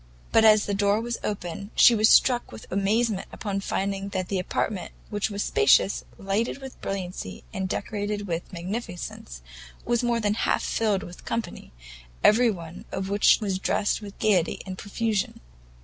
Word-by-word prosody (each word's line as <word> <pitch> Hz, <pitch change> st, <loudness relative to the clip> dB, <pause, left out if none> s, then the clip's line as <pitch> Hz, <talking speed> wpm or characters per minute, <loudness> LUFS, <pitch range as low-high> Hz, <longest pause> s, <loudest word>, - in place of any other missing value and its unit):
But 225 Hz, -, +5 dB
as 215 Hz, -1 st, +6 dB
the 205 Hz, -, -2 dB
door 200 Hz, +1 st, +2 dB
was 235 Hz, +1 st, -3 dB
opened, 200 Hz, -1 st, -4 dB
she 240 Hz, -, +8 dB
was 215 Hz, -1 st, +4 dB
struck 245 Hz, -2 st, +4 dB
with 110 Hz, -, -10 dB
amazement 205 Hz, +2 st, +1 dB
upon 200 Hz, -2 st, -3 dB
finding 195 Hz, 0 st, -2 dB
that 185 Hz, -2 st, -3 dB
the 195 Hz, -, 0 dB
apartment, 185 Hz, +1 st, -2 dB, 0.2 s
which 205 Hz, 0 st, -1 dB
was 205 Hz, -1 st, -2 dB
spacious, 425 Hz, -, +3 dB
lighted 200 Hz, +6 st, -1 dB
with 270 Hz, -2 st, -10 dB
brilliancy, 185 Hz, -2 st, -5 dB
and 190 Hz, -2 st, -2 dB
decorated 205 Hz, 0 st, -3 dB
with 170 Hz, -2 st, -4 dB
magnificence, 175 Hz, -, -6 dB, 0.4 s
was 240 Hz, 0 st, +1 dB
more 240 Hz, -1 st, +1 dB
than 210 Hz, -2 st, +1 dB
half 215 Hz, -, 0 dB
filled 210 Hz, -4 st, 0 dB
with 175 Hz, 0 st, -11 dB
company, 230 Hz, -, -4 dB, 0.5 s
every 235 Hz, +3 st, +6 dB
one 170 Hz, -5 st, -6 dB
of 190 Hz, 0 st, -3 dB
which 200 Hz, +1 st, +5 dB
was 195 Hz, -3 st, -1 dB
dressed 205 Hz, +2 st, 0 dB
with 205 Hz, -1 st, -10 dB
gaiety 195 Hz, -6 st, +2 dB
and 190 Hz, -1 st, -6 dB
profusion. 210 Hz, 0 st, -2 dB
205 Hz, 165 wpm, -26 LUFS, 190-220 Hz, 0.5 s, she